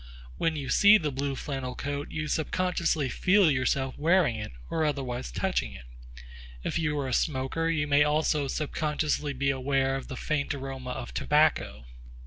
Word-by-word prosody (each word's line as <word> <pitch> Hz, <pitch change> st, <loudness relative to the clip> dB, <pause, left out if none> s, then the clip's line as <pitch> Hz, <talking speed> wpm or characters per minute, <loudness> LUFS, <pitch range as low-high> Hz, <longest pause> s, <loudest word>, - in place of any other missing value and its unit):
When 165 Hz, -1 st, +1 dB
you 140 Hz, -3 st, -4 dB
see 205 Hz, +7 st, +7 dB
the 155 Hz, -7 st, -2 dB
blue 140 Hz, +1 st, -2 dB
flannel 130 Hz, -2 st, -4 dB
coat 145 Hz, +1 st, -4 dB
you 155 Hz, 0 st, -3 dB
subconsciously 165 Hz, -1 st, 0 dB
feel 185 Hz, -, +3 dB
yourself 130 Hz, 0 st, 0 dB
wearing 165 Hz, -5 st, +3 dB
it 105 Hz, -1 st, -6 dB, 0.2 s
or 160 Hz, -, -1 dB
otherwise 130 Hz, -, -2 dB
touching -, -, -1 dB
it. -, -, -11 dB, 0.8 s
If -, -, -1 dB
you 150 Hz, -2 st, 0 dB
are 140 Hz, -2 st, -2 dB
a 130 Hz, -, -2 dB
smoker, 150 Hz, +5 st, 0 dB
you 160 Hz, -3 st, +1 dB
may 145 Hz, 0 st, +4 dB
also 150 Hz, -1 st, +1 dB
subconsciously 150 Hz, 0 st, -1 dB
be 140 Hz, +1 st, +1 dB
aware 135 Hz, 0 st, 0 dB
of 135 Hz, -, -5 dB
the 130 Hz, -, -6 dB
faint 150 Hz, 0 st, -1 dB
aroma 135 Hz, -2 st, -6 dB
of 125 Hz, -1 st, -6 dB
tobacco. 150 Hz, -, +1 dB
145 Hz, 165 wpm, -28 LUFS, 135-155 Hz, 0.8 s, see